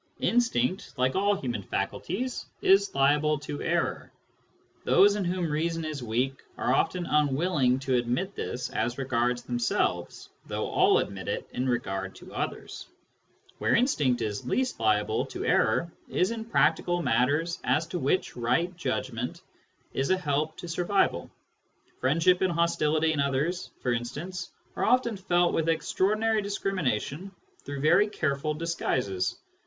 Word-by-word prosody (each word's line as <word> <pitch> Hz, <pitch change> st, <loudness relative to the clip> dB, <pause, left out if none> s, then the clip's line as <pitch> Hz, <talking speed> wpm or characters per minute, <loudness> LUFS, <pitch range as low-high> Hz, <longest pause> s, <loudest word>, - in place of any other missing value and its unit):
Instinct, 190 Hz, -, +1 dB
like 130 Hz, +1 st, +2 dB
all 200 Hz, +1 st, +3 dB
human 120 Hz, -, -3 dB
faculties, 250 Hz, -, -3 dB
is 195 Hz, -2 st, +4 dB
liable 145 Hz, +2 st, +3 dB
to 145 Hz, 0 st, -6 dB
error. -, -, -1 dB, 0.7 s
Those 205 Hz, +1 st, +5 dB
in 205 Hz, -, -1 dB
whom 180 Hz, -1 st, -1 dB
reason 165 Hz, +2 st, -1 dB
is 155 Hz, -3 st, -4 dB
weak 125 Hz, +4 st, -1 dB, 0.2 s
are 125 Hz, -, +1 dB
often 175 Hz, +5 st, +1 dB
unwilling 150 Hz, -3 st, +2 dB
to 135 Hz, -1 st, -1 dB
admit 125 Hz, +11 st, 0 dB
this 125 Hz, -8 st, -4 dB
as 120 Hz, +3 st, -1 dB
regards 125 Hz, -2 st, 0 dB
themselves, 120 Hz, -1 st, -1 dB, 0.2 s
though -, -, -2 dB
all -, -, +4 dB
admit -, -, -3 dB
it -, -, -3 dB
in 130 Hz, +1 st, -1 dB
regard 95 Hz, -5 st, -2 dB
to -, -, -13 dB
others. -, -, -5 dB, 0.7 s
Where -, -, +2 dB
instinct 145 Hz, -, +2 dB
is 105 Hz, -2 st, -3 dB
least 260 Hz, -1 st, -1 dB
liable 110 Hz, -2 st, +2 dB
to -, -, -5 dB
error 170 Hz, 0 st, +2 dB, 0.2 s
is 185 Hz, +4 st, +1 dB
in 225 Hz, -1 st, -4 dB
practical 170 Hz, -1 st, +2 dB
matters 145 Hz, +6 st, +1 dB
as 160 Hz, -, +2 dB
to 175 Hz, -, -3 dB
which 160 Hz, +6 st, 0 dB
right 130 Hz, +10 st, 0 dB
judgment 130 Hz, -6 st, -3 dB, 0.5 s
is 135 Hz, -, -1 dB
a 185 Hz, -, +4 dB
help 155 Hz, -2 st, -1 dB
to 175 Hz, -, -7 dB
survival; 175 Hz, -, 0 dB, 0.7 s
friendship 165 Hz, +7 st, +3 dB
and 185 Hz, -2 st, +2 dB
hostility 160 Hz, -1 st, +2 dB
in 150 Hz, -, -2 dB
others, 140 Hz, +6 st, 0 dB
for 125 Hz, -, +1 dB
instance, 165 Hz, +10 st, -4 dB, 0.3 s
are -, -, -2 dB
often 240 Hz, -1 st, +3 dB
felt 175 Hz, -2 st, +2 dB
with 165 Hz, 0 st, +1 dB
extraordinary 210 Hz, +7 st, +1 dB
discrimination 185 Hz, -, -2 dB, 0.3 s
through 140 Hz, -1 st, -5 dB
very 155 Hz, +8 st, +5 dB
care 150 Hz, -9 st, -1 dB
ful 150 Hz, +2 st, -2 dB
disguises. 130 Hz, -, -1 dB
150 Hz, 145 wpm, -28 LUFS, 130-180 Hz, 0.7 s, Those